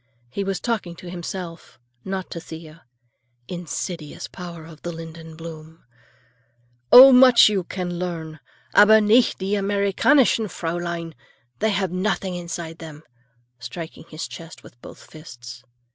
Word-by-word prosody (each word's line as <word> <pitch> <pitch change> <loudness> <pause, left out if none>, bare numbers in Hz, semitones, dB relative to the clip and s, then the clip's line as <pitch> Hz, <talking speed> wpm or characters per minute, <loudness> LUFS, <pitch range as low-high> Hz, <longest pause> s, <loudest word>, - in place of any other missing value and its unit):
He 200 - -3
was 195 -1 -2
talking 215 -8 -3
to 175 +1 -10
himself, 175 -1 -7 0.3
not 190 -1 -5
to 170 - -5
Thea. 160 -1 -11 0.6
Insidious 170 -2 -6
power 170 -3 -9
of 160 -2 -14
the 175 - -5
linden 165 -1 -10
bloom! 160 0 -11 1.1
"Oh, 265 +2 +11
much 250 -3 +8
you 200 -3 -1
can 175 -2 -4
learn! 160 -3 -5 0.3
Aber 215 +1 +7
nicht 220 +4 +3
die 195 +2 -3
Americanischen 205 +5 +2
Fräulein. 170 -1 -4 0.5
They 220 - +1
have 195 -3 -1
nothing 190 0 -1
inside 170 -2 -6
them," 155 -2 -10 0.6
striking 165 +5 -8
his 155 +1 -6
chest 165 0 -11
with 120 - -17
both - - -12
fists. 125 -6 -12
175 Hz, 130 wpm, -23 LUFS, 165-195 Hz, 1.1 s, Oh